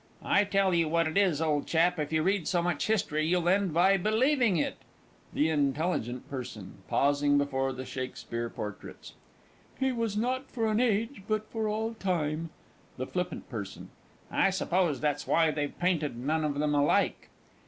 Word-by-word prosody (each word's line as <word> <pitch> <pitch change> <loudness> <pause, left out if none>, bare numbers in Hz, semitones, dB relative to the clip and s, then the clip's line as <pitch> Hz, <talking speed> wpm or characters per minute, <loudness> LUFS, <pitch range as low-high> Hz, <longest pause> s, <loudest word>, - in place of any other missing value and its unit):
I 200 +1 +3
tell 195 -2 +2
you 165 -2 +2
what 165 +1 +2
it 160 - -4
is, 180 -6 +3
old 150 -2 0
chap, 170 +1 +2
if 150 0 -2
you 155 -1 +1
read 190 -2 +1
so 175 -2 +1
much 175 -4 -1
history, 185 -8 +1
you'll 175 0 +1
end 190 0 +3
by 185 +5 +4
believing 225 - +2
it! 150 - -1 0.5
THE 155 +2 +1
INT. 140 -3 +1
P. 135 -5 -2 0.5
(pausing 145 0 +3
before 135 -2 0
the 130 0 -6
Shakspeare 120 -2 -5
portraits). 105 -3 -8 0.7
"He 265 0 +2
was 230 -4 -2
not 255 +4 -1
for 230 -3 -2
an 215 - +1
age, 230 -1 0
but 215 0 -1
for 220 -1 -1
all 220 +2 -2
time." 165 -6 -2 0.5
THE 130 - -3
FL. 180 - -1
P. 180 -1 -5 0.9
I - - +3
suppose 180 -6 0
that's 150 -2 -1
why 165 -1 +3
they've 145 -1 -3
painted 165 -8 0
none 155 +6 -1
of 145 -2 -1
them 150 0 +1
alike. 145 0 +1
170 Hz, 170 wpm, -29 LUFS, 145-200 Hz, 0.9 s, by